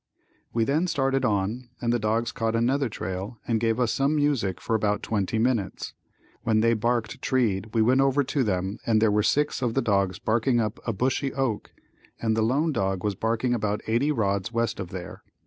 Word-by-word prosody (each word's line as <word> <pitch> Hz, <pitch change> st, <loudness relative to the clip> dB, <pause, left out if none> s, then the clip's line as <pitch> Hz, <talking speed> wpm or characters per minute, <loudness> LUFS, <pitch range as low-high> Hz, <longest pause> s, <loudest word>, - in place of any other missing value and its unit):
We 115 Hz, -, +1 dB
then 150 Hz, +9 st, +1 dB
started 135 Hz, -4 st, 0 dB
on 110 Hz, +4 st, -1 dB
and 120 Hz, 0 st, 0 dB
the 120 Hz, -, +1 dB
dogs 115 Hz, +3 st, 0 dB
caught 115 Hz, -2 st, -1 dB
another 130 Hz, +3 st, +1 dB
trail 95 Hz, +2 st, -5 dB
and 115 Hz, -2 st, +1 dB
gave 115 Hz, +1 st, +1 dB
us 120 Hz, -3 st, +1 dB
some 140 Hz, +3 st, +1 dB
music 135 Hz, -, +1 dB
for 115 Hz, -, -1 dB
about 105 Hz, -1 st, 0 dB
twenty 105 Hz, 0 st, -1 dB
minutes. 115 Hz, -4 st, -1 dB, 0.5 s
When 110 Hz, -1 st, +2 dB
they 115 Hz, +1 st, +4 dB
barked 115 Hz, 0 st, -1 dB
treed 110 Hz, -6 st, +1 dB
we 110 Hz, -, +4 dB
went 130 Hz, +4 st, +4 dB
over 135 Hz, +1 st, +3 dB
to 135 Hz, +1 st, 0 dB
them 95 Hz, 0 st, -2 dB
and 110 Hz, -2 st, +2 dB
there 110 Hz, -1 st, +3 dB
were 105 Hz, +1 st, +3 dB
six 145 Hz, +8 st, +1 dB
of 120 Hz, -3 st, -1 dB
the -, -, +3 dB
dogs 100 Hz, -4 st, +1 dB
barking 120 Hz, +2 st, +1 dB
up 110 Hz, -2 st, -2 dB
a -, -, +2 dB
bushy 130 Hz, +5 st, 0 dB
oak 130 Hz, -6 st, -1 dB, 0.5 s
and 110 Hz, -1 st, 0 dB
the 110 Hz, -, +1 dB
lone 140 Hz, +9 st, +2 dB
dog 95 Hz, -7 st, -1 dB
was 105 Hz, -1 st, 0 dB
barking 115 Hz, +5 st, 0 dB
about 105 Hz, -2 st, -1 dB
eighty 120 Hz, +7 st, +1 dB
rods 100 Hz, -5 st, 0 dB
west 115 Hz, -2 st, -1 dB
of 95 Hz, -3 st, -5 dB
there. 90 Hz, -2 st, -8 dB
115 Hz, 200 wpm, -26 LUFS, 105-130 Hz, 0.5 s, they